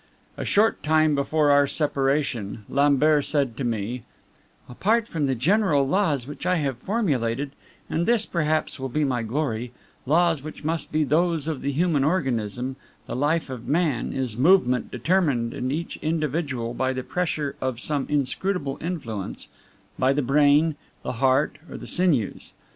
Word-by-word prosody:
A -, -, -5 dB
short 220 Hz, +2 st, +2 dB
time 155 Hz, 0 st, +3 dB
before 145 Hz, +1 st, +2 dB
our 145 Hz, 0 st, +5 dB
separation, 135 Hz, -8 st, -1 dB
Lambert 145 Hz, +1 st, +3 dB
said 140 Hz, -6 st, 0 dB
to 140 Hz, -, -3 dB
me: 120 Hz, +1 st, -2 dB, 0.7 s
"Apart 220 Hz, -, +1 dB
from 155 Hz, -8 st, -1 dB
the 135 Hz, -, 0 dB
general 155 Hz, -, +2 dB
laws 155 Hz, -7 st, +1 dB
which 145 Hz, +2 st, -8 dB
I 180 Hz, -, +3 dB
have 140 Hz, -7 st, -1 dB
formulated 140 Hz, -, -1 dB, 0.4 s
and 170 Hz, +2 st, -1 dB
this, 235 Hz, -2 st, +3 dB
perhaps, 155 Hz, -3 st, -1 dB
will 135 Hz, 0 st, -3 dB
be 150 Hz, +5 st, 0 dB
my 130 Hz, -4 st, 0 dB
glory 120 Hz, -1 st, -2 dB, 0.3 s
laws 165 Hz, 0 st, +3 dB
which 155 Hz, +1 st, -9 dB
must 160 Hz, +2 st, -2 dB
be 155 Hz, 0 st, +2 dB
those 160 Hz, +1 st, +1 dB
of 155 Hz, -4 st, -3 dB
the 140 Hz, -, -1 dB
human 155 Hz, -1 st, +1 dB
organism, 130 Hz, -, -1 dB, 0.3 s
the -, -, -5 dB
life 145 Hz, +2 st, 0 dB
of 125 Hz, -3 st, -7 dB
man 150 Hz, -5 st, 0 dB
is 130 Hz, -5 st, -3 dB
Movement 125 Hz, -, +3 dB
determined 130 Hz, -, +1 dB
in 130 Hz, -, -3 dB
each 165 Hz, +4 st, -3 dB
individual 150 Hz, -6 st, -2 dB
by 130 Hz, +1 st, 0 dB
the 130 Hz, 0 st, -4 dB
pressure 155 Hz, -5 st, -2 dB
of 130 Hz, -3 st, -2 dB
some 145 Hz, +1 st, +1 dB
inscrutable 145 Hz, +2 st, -1 dB
influence 120 Hz, -, -5 dB, 0.5 s
by 130 Hz, +1 st, +3 dB
the 145 Hz, 0 st, 0 dB
brain, 145 Hz, +3 st, +4 dB, 0.3 s
the -, -, -2 dB
heart, 130 Hz, +4 st, +1 dB
or -, -, -7 dB
the -, -, -9 dB
sinews. 160 Hz, -, 0 dB
145 Hz, 160 wpm, -24 LUFS, 130-160 Hz, 0.7 s, our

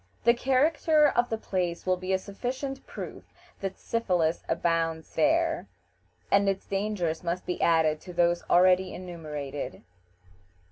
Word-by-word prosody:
The 235 Hz, -, +6 dB
character 295 Hz, +5 st, +3 dB
of 240 Hz, -2 st, +1 dB
the 225 Hz, -, -1 dB
place 180 Hz, -5 st, -2 dB
will 185 Hz, 0 st, +3 dB
be 185 Hz, +1 st, -4 dB
a 190 Hz, -, +4 dB
sufficient 255 Hz, +8 st, -5 dB
proof -, -, -7 dB, 0.4 s
that 195 Hz, -1 st, -4 dB
syphilis 180 Hz, -8 st, 0 dB
abounds 165 Hz, -1 st, 0 dB
there, 330 Hz, +2 st, +2 dB, 0.6 s
and 200 Hz, 0 st, +4 dB
its 195 Hz, 0 st, -2 dB
dangers 195 Hz, -5 st, -2 dB
must 175 Hz, +1 st, -2 dB
be 180 Hz, -, -3 dB
added 160 Hz, -2 st, +3 dB
to 180 Hz, -, -10 dB
those 175 Hz, 0 st, +2 dB
already 185 Hz, +1 st, +4 dB
enumerated. 150 Hz, -, -6 dB
185 Hz, 135 wpm, -28 LUFS, 170-230 Hz, 0.6 s, The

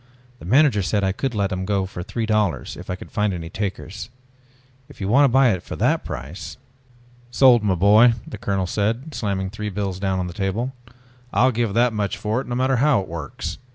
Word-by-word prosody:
The -, -, -11 dB
manager 130 Hz, -, +4 dB
said 100 Hz, +2 st, 0 dB
I 95 Hz, -, +2 dB
could 125 Hz, +5 st, -3 dB
let 100 Hz, -1 st, 0 dB
them 95 Hz, 0 st, -2 dB
go 100 Hz, 0 st, 0 dB
at 90 Hz, -, -5 dB
three 115 Hz, -2 st, -2 dB
dollars 105 Hz, -, 0 dB
if -, -, -11 dB
I 90 Hz, -, -1 dB
could -, -, -12 dB
find 105 Hz, -2 st, 0 dB
any 80 Hz, -1 st, -7 dB
takers. 100 Hz, +1 st, -5 dB, 0.8 s
If -, -, -15 dB
you 95 Hz, -, -3 dB
want 135 Hz, +7 st, +5 dB
to -, -, +4 dB
buy 130 Hz, 0 st, +5 dB
it 95 Hz, -3 st, -2 dB
for -, -, -7 dB
that -, -, +1 dB
price...." 70 Hz, +9 st, -7 dB, 0.7 s
"Sold, 120 Hz, -1 st, +5 dB
my 100 Hz, -3 st, +1 dB
boy!" 105 Hz, +6 st, +6 dB
the 110 Hz, -, -8 dB
colonel 95 Hz, -2 st, -1 dB
said, 115 Hz, -, -2 dB
slamming 95 Hz, -5 st, -2 dB
three 105 Hz, 0 st, -4 dB
bills 100 Hz, -2 st, -3 dB
down 95 Hz, -1 st, 0 dB
on 90 Hz, -, -1 dB
the 90 Hz, -, -6 dB
table. 105 Hz, +7 st, -2 dB, 0.6 s
"I'll 125 Hz, +6 st, +3 dB
give 115 Hz, -3 st, -1 dB
that 120 Hz, 0 st, +3 dB
much 105 Hz, -2 st, -2 dB
for 110 Hz, +4 st, -1 dB
it -, -, -10 dB
no 120 Hz, -, -3 dB
matter 130 Hz, +1 st, +1 dB
how 140 Hz, -1 st, +3 dB
it 95 Hz, -, -8 dB
works. 80 Hz, -4 st, -6 dB
105 Hz, 220 wpm, -22 LUFS, 95-120 Hz, 0.8 s, boy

